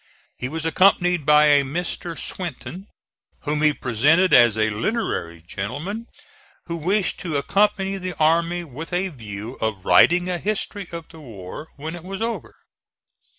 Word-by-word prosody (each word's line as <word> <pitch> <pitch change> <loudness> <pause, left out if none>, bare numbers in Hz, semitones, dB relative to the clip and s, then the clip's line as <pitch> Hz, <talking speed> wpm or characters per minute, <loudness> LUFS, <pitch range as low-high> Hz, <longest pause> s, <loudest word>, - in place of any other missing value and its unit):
He 125 - -5
was 160 +2 -4
accompanied 180 -2 +3
by 150 0 +6
a 145 -1 +5
Mr. 170 +3 -4
Swinton, 180 +2 -6 0.5
whom 150 0 -1
he 155 0 +5
presented 145 +9 +2
as 120 -3 +6
a 110 0 +2
literary 105 - -2
gentleman 145 - -5 0.6
who 170 - -4
wished 185 +5 0
to 165 -5 -2
accompany 195 +4 +1
the 185 -2 -5
army 170 +2 +2
with 160 +3 -9
a 185 +2 0
view 110 - -8
of 105 -4 -2
writing 175 +1 +5
a 180 -1 -2
history 205 -1 -3
of 170 -2 -7
the 165 - -13
war 115 - -9
when 155 +3 -6
it 170 - -10
was 190 +1 -6
over. 220 - -4
160 Hz, 150 wpm, -22 LUFS, 130-185 Hz, 0.6 s, by